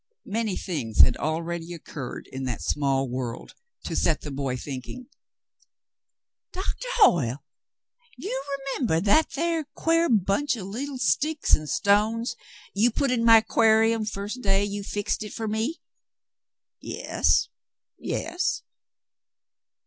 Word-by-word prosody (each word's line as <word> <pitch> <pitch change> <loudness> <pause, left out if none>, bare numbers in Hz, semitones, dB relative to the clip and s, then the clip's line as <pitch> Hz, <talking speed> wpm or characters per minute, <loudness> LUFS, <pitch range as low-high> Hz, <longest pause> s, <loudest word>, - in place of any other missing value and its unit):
Many 215 -1 -2
things 135 - +1
had 125 - +6
already 165 +2 -3
occurred 145 -5 -7
in 130 0 -4
that 125 -2 -3
small 135 -2 +1
world 125 -1 -5 0.3
to - - -4
set 160 -3 +1
the 145 - -6
boy 135 -2 -2
thinking. 135 - -7 1.5
"Doctah 385 +6 -4
Hoyle, 145 - +4 0.7
you 270 -8 -4
remembeh 270 - -1
that 305 +10 +4
thar 330 +1 0
quare 330 +1 +2
bunch 215 +7 +2
of 205 -5 -6
leetle 260 +8 -5
sticks 265 - +2
an' 155 - -7
stones 215 - +2 0.4
you 215 +5 +4
put 275 +3 0
in 240 -2 +1
my 225 -1 +8
'quar'um 225 0 +3
first 210 +3 -5
day 195 -1 +2
you 205 0 -4
fixed 205 +2 -2
hit 210 - -6
up - - -9
fer 225 - -3
me? 220 +10 -2 0.5
" - - -66
"Yes, - - +1 0.5
yes." 355 +2 -2
210 Hz, 130 wpm, -26 LUFS, 155-255 Hz, 1.5 s, my